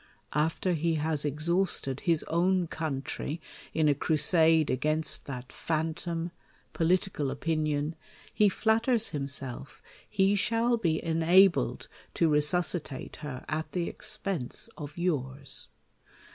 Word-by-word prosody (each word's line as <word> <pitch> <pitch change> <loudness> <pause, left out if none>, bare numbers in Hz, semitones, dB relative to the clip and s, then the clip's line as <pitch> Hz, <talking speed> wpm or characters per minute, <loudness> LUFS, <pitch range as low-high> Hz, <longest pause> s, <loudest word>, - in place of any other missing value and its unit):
After 160 +4 +1
he 165 0 +1
has 155 -1 0
exhausted 155 -2 +1
his 165 -3 +2
own 180 +1 +1
coimtry 155 0 -4 0.3
in 155 -1 +2
a 145 - +5
crusade 160 +2 +4
against 155 +3 0
that 125 -2 -6
phantom, 165 +1 -2 0.4
political 170 -3 +1
o{)inion, 155 0 -1 0.4
he 210 -1 +4
flatters 225 +3 +2
him 140 -3 -3
self 135 0 -4 0.3
he 195 -1 +3
shall 230 +4 +2
be 165 -8 0
enabled 170 +3 +4 0.3
to 165 - +3
resuscitate 150 0 0
her 140 -4 -7
at 155 +1 -3
the 175 -2 -1
ex 215 0 -7
pense 185 -13 -4
of 145 +1 -8
yours. 140 -6 -1
160 Hz, 115 wpm, -29 LUFS, 150-180 Hz, 0.4 s, a